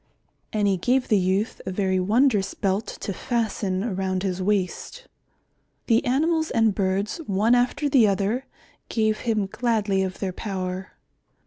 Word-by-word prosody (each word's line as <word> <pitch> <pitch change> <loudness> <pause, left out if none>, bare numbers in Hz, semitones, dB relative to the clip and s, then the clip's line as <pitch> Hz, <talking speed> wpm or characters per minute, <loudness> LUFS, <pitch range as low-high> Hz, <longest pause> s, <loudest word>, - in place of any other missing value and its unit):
And 210 -2 +1
he 195 -1 +2
gave 250 +7 +1
the 210 - +4
youth 190 +4 0
a - - -4
very 190 -1 0
wondrous 210 0 +2
belt 200 +2 -1
to 200 - -3
fasten 205 -5 -1
around 190 -4 -2
his 185 -1 -2
waist. 210 - -2 0.8
The 230 -1 +3
animals 315 +5 +1
and 225 -3 +2
birds, 195 - -1
one 205 +4 +2
after 250 +4 +2
the 260 -6 +5
other, 205 +6 0 0.4
gave 220 -1 +1
him 220 -4 0
gladly 210 -2 0
of 190 -1 -3
their 190 -2 -3
power. 185 -2 -4
205 Hz, 145 wpm, -24 LUFS, 190-235 Hz, 0.8 s, the